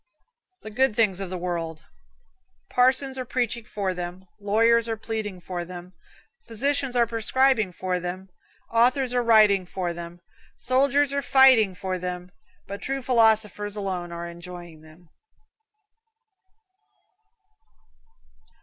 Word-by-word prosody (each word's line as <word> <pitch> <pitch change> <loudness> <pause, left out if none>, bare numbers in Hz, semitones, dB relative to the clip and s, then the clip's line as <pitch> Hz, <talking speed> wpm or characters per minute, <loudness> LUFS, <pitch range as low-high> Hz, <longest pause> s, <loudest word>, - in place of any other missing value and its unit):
The 215 - -8
Good 260 0 +1
Things 210 -5 +2
of 195 -2 -5
the 185 - -4
World. 170 -3 -4 0.9
Parsons 260 +1 +2
are - - -2
preaching 240 -2 -2
for 195 -3 -3
them, 180 +1 -7
lawyers 230 +3 +2
are 225 - -2
pleading 215 -4 -5
for 175 0 -5
them, 180 +1 -10 0.5
physicians 270 +3 -1
are 240 -1 +4
prescribing 230 -1 +1
for 180 0 -3
them, 180 +2 -6 0.4
authors 250 +2 +2
are 245 - +2
writing 215 -4 +5
for 180 -1 -4
them, 170 0 -9 0.4
soldiers 275 +3 +2
are 280 - 0
fighting 255 -8 +5
for 185 0 -4
them, 180 0 -6 0.3
but 200 +1 -8
true 270 0 -3
philosophers 220 -4 +2
alone 185 -4 -4
are 170 0 -6
enjoying 170 -1 -10
them. 160 +3 -18
205 Hz, 120 wpm, -25 LUFS, 180-245 Hz, 0.9 s, writing